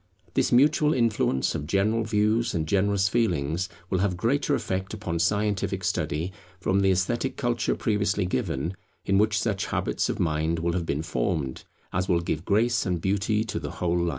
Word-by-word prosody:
This - - +1
mutual 150 +4 +4
influence 110 - +1
of 75 - -4
general 105 +5 +1
views 110 +1 +1
and 80 -2 -1
generous 100 +2 +2
feelings 90 -5 0 0.2
will 95 - +2
have 95 -2 0
greater 140 +8 +1
effect 95 -3 -3
upon 90 -6 -3
scientific 100 +1 0
study, 85 0 -1 0.3
from 95 +1 +1
the 95 0 +3
esthetic 120 +8 0
culture 120 -3 0
previously 105 -2 0
given, 85 +1 -2 0.3
in 100 0 +3
which 105 0 +3
such 110 -3 -1
habits - - -1
of - - -2
mind 80 0 0
will 85 +1 -1
have 85 -2 -2
been 75 +2 -1
formed, 65 -1 -2 0.3
as 90 +1 -1
will 85 -2 +3
give 85 -1 -3
grace 115 +3 +2
and 90 -3 -1
beauty 100 +4 +1
to 110 - -4
the - - -6
whole 85 -1 -1
life. 85 0 +1
95 Hz, 180 wpm, -26 LUFS, 85-110 Hz, 0.3 s, mutual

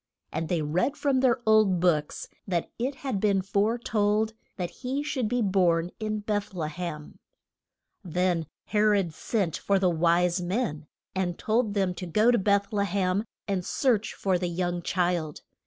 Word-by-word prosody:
And 165 - -2
they 170 -4 0
read 180 - 0
from 275 -2 +1
their 255 -2 +3
old 215 -4 +4
books 160 -4 0 0.2
that 175 -3 -1
it 260 +4 -1
had 255 -7 -1
been 195 -2 +2
fore 205 +4 +1
told 215 -1 +1 0.2
that 180 -3 -3
he 270 +3 -2
should 280 -6 -1
be 245 +1 0
born 180 -3 +2
in 215 -1 -2
Beth 205 -1 -2
le 155 -3 -2
hem. 155 -2 -6 0.8
Then 175 -2 0 0.2
He 210 - -1
rod 200 -6 +3
sent 185 -3 -1
for 200 - +1
the 185 -2 +2
wise 175 +2 +2
men, 175 -5 -2 0.3
and 180 -2 -1
told 220 -1 0
them 190 -2 +1
to 180 0 -6
go 215 +8 +4
to 240 - +3
Beth 200 +1 +1
le 200 -1 +2
hem, 195 +2 0 0.2
and 195 -3 -1
search 225 0 0
for 185 -2 0
the 180 -1 -1
young 175 0 -2
child. 175 -4 -1
195 Hz, 170 wpm, -27 LUFS, 175-215 Hz, 0.8 s, old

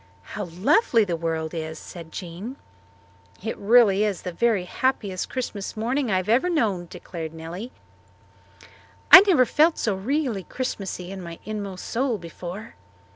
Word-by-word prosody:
"How 210 -1 -3
lovely 225 - +3
the 175 -3 -1
world 160 -1 -3
is," 160 -1 -5
said 165 -1 -10
Jean. 185 +10 -7 0.8
"This 220 +3 -4
is - - -16
really 210 -2 +5
the 180 -1 -6
very 215 +1 +1
happiest 200 -3 -1
Christmas 215 -5 -4
morning 250 +4 0
I 190 - +2
have 185 +1 -2
ever 250 +11 +3
known," 210 - 0
declared 165 -2 -7
Nellie. 175 +9 -7 1.4
"I 370 - +14
never 315 -10 +5
felt 315 +6 +3
so 215 - 0
really 240 +2 -1
Christmassy 195 -7 -5
in 195 -1 -7
my 170 -1 -8
inmost 200 -3 -5
soul 245 -1 0
before." 180 +4 -8
200 Hz, 145 wpm, -24 LUFS, 175-240 Hz, 1.4 s, I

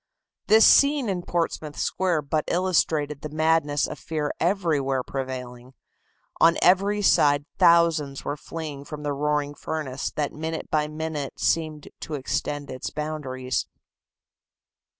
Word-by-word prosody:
This 220 +2 +7
scene 280 -4 +5
in 185 -2 -1
Portsmouth 165 -3 -3
Square 175 -5 0
but 150 +2 -1
illustrated 160 -5 +1
the 155 - -5
madness 155 -1 +1
of - - -7
fear 155 -2 -3
everywhere 155 -8 +1
prevailing. 130 -1 -6 0.6
On 165 0 +5
every 200 +3 +3
side 145 -5 +4
thousands 165 -5 +3
were 145 - -2
fleeing 150 -2 -7
from 150 +1 -8
the 145 -1 -1
roaring 145 0 -1
furnace 145 -3 -4
that 150 -2 -2
minute 160 +1 -5
by 150 -1 +1
minute 155 -2 -5
seemed 155 -2 -1
to 155 - -5
extend 145 +1 -3
its 130 - -5
boundaries. 140 -4 -3
150 Hz, 130 wpm, -25 LUFS, 145-165 Hz, 0.6 s, This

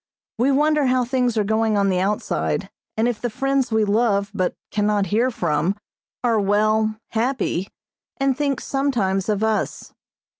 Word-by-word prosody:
We 250 +3 +3
wonder 295 0 +3
how 255 -1 +2
things 250 -2 0
are 215 - +3
going 220 +1 +1
on 200 -1 +2
the 185 -1 +1
outside 200 +3 -1 0.3
and 225 +2 +2
if 240 -3 -2
the 240 - -1
friends 270 +1 0
we 220 -1 +2
love 205 -1 +1
but 185 -3 -1 0.2
cannot 210 -1 +1
hear 240 +4 +3
from 170 -4 0 0.5
are 230 -3 +2
well, 215 +2 +2
happy, 230 -5 -1 0.5
and 275 -1 +1
think 280 -2 -1
sometimes 225 -9 0
of 210 0 0
us. 220 -1 -2
220 Hz, 155 wpm, -22 LUFS, 205-255 Hz, 0.5 s, We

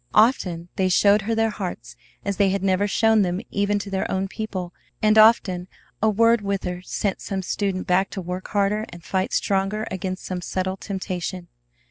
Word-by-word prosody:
Often 185 -7 +3
they 185 -1 +2
showed 200 +3 +5
her 225 +2 -1
their 225 0 +2
hearts 150 - -6 0.3
as 200 -1 -1
they 200 -1 +4
had 195 0 -1
never 195 +1 +2
shown 220 +1 +3
them 180 -1 0
even 200 +1 +1
to 200 0 -5
their 190 - -1
own 190 0 -1
people, 190 -4 -5 0.3
and 215 0 +3
often 205 -5 +5 0.3
a 220 - +4
word 230 +2 +4
with 200 -1 -2
her 180 0 -4
sent 195 +1 -2
some 195 -1 -3
student 190 0 -2
back 185 +2 +2
to - - -6
work 180 +1 -5
harder 205 +1 +1
and 175 -1 -11
fight 190 0 -1
stronger 195 +2 0
against 185 0 -4
some 180 -1 -4
subtle 185 +1 -2
temptation. 185 -3 -5
195 Hz, 185 wpm, -23 LUFS, 185-210 Hz, 0.3 s, showed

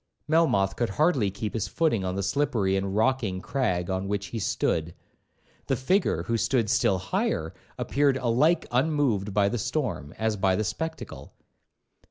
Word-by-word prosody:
Melmoth 150 -12 +2
could 120 - -1
hardly 135 - +2
keep 105 +2 -5
his 110 -4 -2
footing 155 -12 0
on 90 0 -2
the 100 - -2
slippery 105 -3 +1
and 95 0 -2
rocking 110 -4 +1
crag 95 -6 -1
on 95 +1 -2
which 100 0 -2
he 115 - -4
stood; 85 -4 -1 0.7
the - - +1
figure, 185 +9 +1
who 115 - -1
stood 115 -2 +1
still 100 -5 +3
higher, 90 0 -2 0.2
appeared 140 -1 +1
alike 135 +7 +2
unmoved 125 -7 +1
by 100 0 +3
the 120 +3 -1
storm, 120 - -2
as 110 -1 0
by 95 -1 +2
the 110 - 0
spectacle. 160 +10 -5
110 Hz, 160 wpm, -26 LUFS, 95-135 Hz, 0.7 s, still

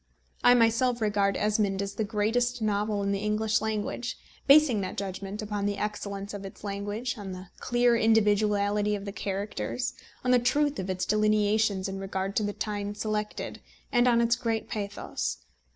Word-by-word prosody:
I 245 - +7
myself 235 +1 +3
regard 205 -2 +1
Esmond 210 -2 +1
as 200 0 -3
the 220 - -1
greatest 225 +4 0
novel 210 -1 0
in 200 - 0
the 200 - 0
English 215 +1 +1
language, 220 +3 -2 0.3
basing 280 -7 +6
that 185 - -5
judgment 195 +2 -4
upon 205 -1 -2
the 205 0 -1
excellence 200 -1 -4
of 200 -1 -6
its 195 - -10
language, 205 +4 -3
on 195 -2 -6
the 185 0 -9
clear 240 -1 +3
individuality 210 -2 +3
of 200 0 -6
the 200 - -4
characters, 200 +5 -3 0.3
on 250 - +2
the 250 - +6
truth 285 +4 +1
of 190 0 -4
its 185 -1 -1
delineations 215 -1 +2
in 195 0 -5
regard 195 0 -3
to - - +3
the 205 - -1
time 205 -1 -3
selected, 210 0 -3 0.3
and 240 0 +4
on 235 -1 +4
its 235 0 +3
great 230 -3 -2
pathos. 205 -1 -3
210 Hz, 170 wpm, -28 LUFS, 200-225 Hz, 0.3 s, I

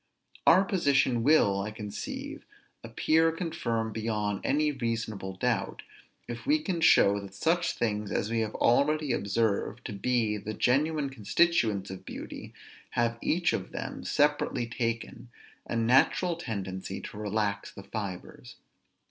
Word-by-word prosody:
Our 185 +3 +7
position 140 - +2
will, 110 -8 +4
I 105 - -3
conceive, 105 -1 -6 0.4
appear 160 +8 +2
confirmed 160 - -2
beyond 105 -2 -2
any 150 +2 +2
reasonable 115 -7 -3
doubt, - - -1 0.4
if 120 - -7
we 300 +2 +5
can 190 - -3
show 100 -10 +5
that 100 -1 -10
such 170 - +1
things 105 -3 -2
as 105 - -1
we 115 - +1
have 110 -1 -2
already 150 +4 +2
observed 110 +1 -1
to 110 - -4
be 110 0 0
the 105 +1 -6
genuine 140 +4 +1
constituents 110 - +1
of 95 - -8
beauty - - -8 0.5
have 115 0 +1
each 175 +2 +1
of 95 - -4
them, - - -5
separately 145 -4 +1
taken, 115 0 -4 0.4
a - - -3
natural 130 +9 +3
tendency 95 - -5
to - - -9
relax 105 -1 -2
the 100 - -11
fibres. 100 -4 -7
115 Hz, 135 wpm, -29 LUFS, 105-150 Hz, 0.5 s, Our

